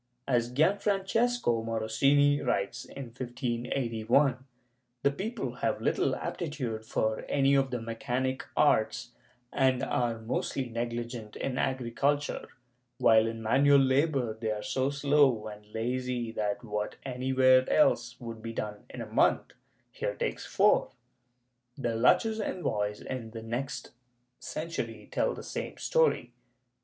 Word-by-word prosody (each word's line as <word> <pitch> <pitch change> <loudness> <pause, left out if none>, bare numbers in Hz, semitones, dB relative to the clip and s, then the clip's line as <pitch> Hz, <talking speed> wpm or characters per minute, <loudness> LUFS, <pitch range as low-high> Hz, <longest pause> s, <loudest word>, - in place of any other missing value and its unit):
As 120 -2 +1
Gianfrancesco 195 - +1
Morosini 135 +6 +2
writes, 100 +5 -1
in 135 -3 -8
1581, 120 +1 0 0.6
the 140 - +4
people 215 - -4
have - - 0
little - - +1
aptitude 130 -9 -4
for 110 0 -1
any 140 -1 +3
of 135 -1 +3
the 125 -1 -2
mechanic 125 +3 -2
arts, 115 -4 +2 0.4
and 130 -2 +2
are 120 -2 0
most 110 +2 -3
negligent 120 -2 -4
in 130 -1 -3
agriculture, 135 +3 0 0.5
while 110 0 +5
in 115 0 -5
manual 140 +6 +5
labor 135 -2 +2
they 110 0 -4
are 105 -1 -2
so 130 +1 0
slow 140 -5 +3
and 105 -1 -9
lazy 120 +1 -2
that 105 +1 -2
what 105 -2 -3
anywhere 130 0 +3
else 125 -5 +2
would 115 -2 -7
be 115 0 -6
done 105 -2 -5
in - - -7
a - - -11
month, - - +2 0.4
here - - -3
takes - - -3
four.^ - - +3 0.8
The 120 -4 -1
Lucchese* 220 - +3
envoys, 105 - -2
in 125 -4 -5
the 110 0 -8
next 120 +4 -4 0.5
century, 165 +2 -5
tell - - 0
the - - -8
same - - -5
story. 485 -1 +1
125 Hz, 125 wpm, -29 LUFS, 115-140 Hz, 0.8 s, while